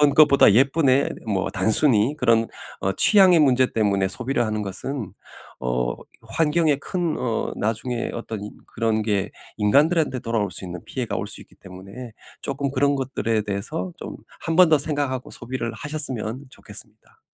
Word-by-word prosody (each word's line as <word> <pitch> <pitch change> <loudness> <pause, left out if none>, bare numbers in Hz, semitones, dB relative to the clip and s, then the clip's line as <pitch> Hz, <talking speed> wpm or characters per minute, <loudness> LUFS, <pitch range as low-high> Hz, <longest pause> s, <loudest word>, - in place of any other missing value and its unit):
것보다 140 -8 +6
예쁘네." 135 +2 +3 0.2
뭐 95 -2 -1
단순히 115 +2 +5
그런 115 -4 +2 0.3
어 95 - -1
취향의 190 - +6
문제 130 -3 +3
때문에 100 -3 +1
소비를 120 +1 -1
하는 110 0 -3
것은 110 +3 -5 0.5
어 60 0 -1 0.3
환경에 150 +6 +1
큰 170 +2 -3
어 115 -3 -2
나중에 115 +3 -2
어떤 110 -3 -6
이 - - -9 0.2
그런 110 -1 -1
게 100 -2 -1 0.3
인간들한테 140 +5 +2
돌아올 110 -4 -2
수 - - -2
있는 90 -1 -8
피해가 125 -4 -4
올 - - -4
수 - - -4
있기 - - -18
때문에 95 +6 -11 0.3
쪼끔 140 0 -3
그런 140 +1 +1
것들에 115 -5 -2
대해서 110 - -4
좀 - - -8 0.2
1 165 - -2
번 180 -3 +7
더 155 - +5
생각하고 140 -3 -2
소비를 120 -1 -4
하셨으면 130 -2 -1
좋겠습니다. 105 -1 -10
120 Hz, 320 characters per minute, -22 LUFS, 105-140 Hz, 0.5 s, 번